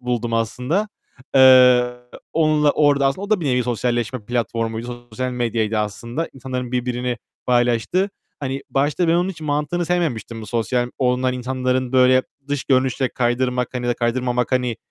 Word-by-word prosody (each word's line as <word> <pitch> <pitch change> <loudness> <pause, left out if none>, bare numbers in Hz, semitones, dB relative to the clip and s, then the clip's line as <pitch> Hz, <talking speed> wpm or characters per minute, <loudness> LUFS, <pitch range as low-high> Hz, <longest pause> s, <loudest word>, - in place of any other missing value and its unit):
buldum 120 -2 -2
aslında. 125 - -1 0.5
Eee, 125 -2 +7 0.4
onunla 155 -2 +3
orada 145 -2 +3
aslında 135 +8 -1
O 205 - -8
da 215 -4 +3
bir 155 - -3
nevi 125 -2 +2
sosyalleşme 120 0 -2
platformuydu, 120 +1 -3
sosyal 130 +3 -3
medyaydı 115 -3 -1
aslında. 115 +9 -3
İnsanların 125 -2 -5
birbirini 125 0 -1 0.3
paylaştığı. 125 - +1 0.3
Hani 135 0 -3
başta 145 +5 +1
ben 165 - +4
onun 175 +2 +1
hiç 165 -4 -11
mantığını 150 +3 -1
sevmemiştim 130 - -2
bu - - -8
sosyal 120 +2 -1
olunan 125 0 +1
insanların 130 0 -1
böyle 130 0 +5 0.3
dış 145 -1 -2
görünüşe 130 0 +1
kaydırmak, 125 0 0
hani, 125 -1 -3
ya 120 - +1
da - - +1
kaydırmamak 125 +1 -1
hani 125 -3 0
125 Hz, 155 wpm, -21 LUFS, 120-135 Hz, 0.5 s, Eee